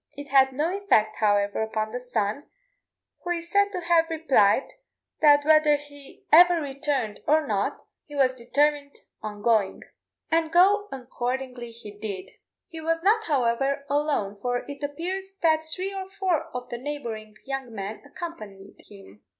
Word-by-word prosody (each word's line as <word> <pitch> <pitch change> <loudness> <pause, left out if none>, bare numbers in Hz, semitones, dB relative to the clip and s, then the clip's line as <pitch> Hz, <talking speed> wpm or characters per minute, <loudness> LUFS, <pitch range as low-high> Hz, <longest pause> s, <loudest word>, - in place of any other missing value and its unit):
It 285 0 -8
had 265 -1 +5
no 310 +8 -1
effect, 305 - +2
however, 205 -1 +1
upon 215 0 -2
the 245 - -4
son, 245 +2 -2 0.8
who 350 - -5
is 340 -1 -3
said 405 0 +3
to 365 -3 -4
have 335 -1 +3
replied, 275 -8 +2 0.5
that 290 -1 +6
whether 310 -1 +5
he 285 -1 -12
ever 350 +2 +7
returned 275 -6 -2
or 310 +1 +3
not, 205 -5 -2 0.2
he 295 - -10
was 265 -2 +3
determined 285 +3 0 0.3
on 210 -1 -7
going; 220 -5 +1 0.5
and 325 -1 +2
go 400 +4 +4
accordingly 250 -1 -4
he 230 -2 -11
did. 205 -2 -6 0.4
He 325 -3 -8
was 330 +1 -1
not, 440 +3 +3
however, 275 0 +1
alone, 280 -9 0
for 245 0 -2
it 285 0 -8
appears 370 +7 -4
that 315 -1 +3
three 375 +5 -4
or 380 -1 -6
four 365 -6 +1
of 250 0 -7
the 240 - -5
neighbouring 235 -6 -6
young 270 -3 -4
men 205 0 -6
accompanied 215 - -9
him. 105 - -15
280 Hz, 155 wpm, -26 LUFS, 230-325 Hz, 0.8 s, ever